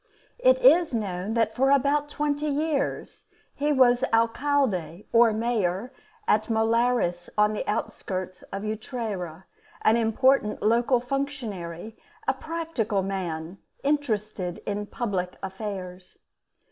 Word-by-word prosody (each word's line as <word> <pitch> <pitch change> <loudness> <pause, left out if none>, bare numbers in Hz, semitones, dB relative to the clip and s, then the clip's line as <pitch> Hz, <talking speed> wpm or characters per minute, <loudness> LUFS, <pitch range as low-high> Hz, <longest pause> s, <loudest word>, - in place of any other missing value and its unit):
It - - +5
is 345 - +5
known 200 0 -2
that 225 -1 +1
for 270 +2 +3
about 285 +2 +3
twenty 295 0 -1
years 300 0 -2 0.3
he 295 +1 0
was 255 -3 +4
alcalde 225 - +1
or 230 -1 +6
mayor 220 -1 -1 0.3
at 215 0 +3
the 230 - -2
Molares 225 -6 +1
on 210 0 +4
the 210 - -2
outskirts 185 -3 -3
of 195 +1 -4
Utrera, 215 - -4 0.4
an 220 +2 +5
important 230 0 +2
local 235 +3 +3
functionary, 225 - -4 0.3
a - - +4
practical 310 - -2
man 180 -2 -4 0.2
interested 215 - -1
in 205 0 -3
public 190 -7 -3
affairs. 190 -2 -6
225 Hz, 115 wpm, -26 LUFS, 195-270 Hz, 0.4 s, or